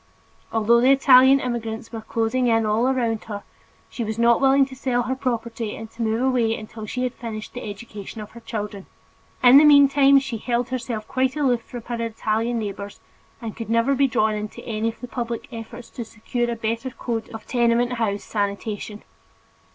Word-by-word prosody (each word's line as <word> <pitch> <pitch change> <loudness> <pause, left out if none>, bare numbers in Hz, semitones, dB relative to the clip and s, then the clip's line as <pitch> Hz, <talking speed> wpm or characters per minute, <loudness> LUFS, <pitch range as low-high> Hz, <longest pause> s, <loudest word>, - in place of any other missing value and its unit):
Although 225 +1 +3
the 255 - +4
Italian 270 0 +7
immigrants 230 -3 -4
were 225 -1 -6
closing 230 +3 0
in 225 -1 +3
all 215 +4 +2
around 235 -4 0
her, 205 -2 -6 0.4
she 240 - -5
was 220 0 -4
not 235 +1 +4
willing 270 0 +5
to 265 0 -11
sell 250 -2 0
her 255 +2 -2
property 235 -4 -3
and 225 0 -9
to 235 - -9
move 225 +2 0
away 240 -4 +2
until 215 0 -9
she 250 +4 -3
had 250 -1 -1
finished 220 -2 -7
the 245 -3 -6
education 205 +1 -8
of 210 - -8
her 235 - -11
children. 210 -3 -6 0.6
In 255 +3 +9
the - - +6
meantime 280 -1 +6
she 265 -4 -1
held 240 +1 -1
herself 235 -4 -4
quite 260 +1 0
aloof 260 -6 +1
from 240 0 -9
her 235 0 -4
Italian 225 +1 -1
neighbors 205 -2 -5 0.4
and 225 -2 -5
could 230 -2 -7
never 230 +4 +3
be 275 0 +3
drawn 220 -3 +1
into 210 0 -6
any 225 0 -1
of 230 - -10
the 250 - -6
public 235 +2 -4
efforts 225 +1 -9
to 240 - -5
secure 240 +2 -3
a 235 - -1
better 230 +3 -2
code 235 -2 -4
of 220 -1 -9
tenement 240 0 +2
house 215 -4 -1
sanitation. 205 0 -3
230 Hz, 190 wpm, -23 LUFS, 220-250 Hz, 0.6 s, In